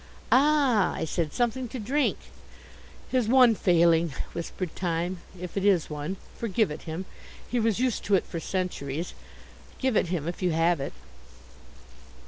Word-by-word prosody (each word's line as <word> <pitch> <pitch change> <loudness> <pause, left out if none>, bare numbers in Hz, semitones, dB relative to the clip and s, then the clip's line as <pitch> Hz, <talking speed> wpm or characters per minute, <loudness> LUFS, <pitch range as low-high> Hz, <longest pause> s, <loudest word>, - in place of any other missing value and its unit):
"Ah," 275 -6 +4
I - - -2
said, 160 -1 -1
"something 245 +4 0
to 245 - -6
drink?" 265 +6 0 0.9
"His 255 -4 +2
one 250 -1 +6
failing," 170 -5 +3 0.2
whispered 170 +1 -5
Time, 175 0 -2 0.2
"if 180 0 -7
it 195 - -1
is 190 -6 +3
one. 150 +6 -4 0.2
Forgive 220 -5 0
it 150 - -6
him. 170 +4 -4 0.4
He 245 - 0
was 225 -2 +1
used 255 -2 0
to 205 - +4
it 185 - +1
for 165 - -5
centuries. 170 -4 -3 0.6
Give 260 -3 0
it 190 - +3
him 165 -3 -2
if 175 - -4
you 180 -3 +1
have 165 0 +2
it." 135 - -4
185 Hz, 155 wpm, -27 LUFS, 165-235 Hz, 0.9 s, one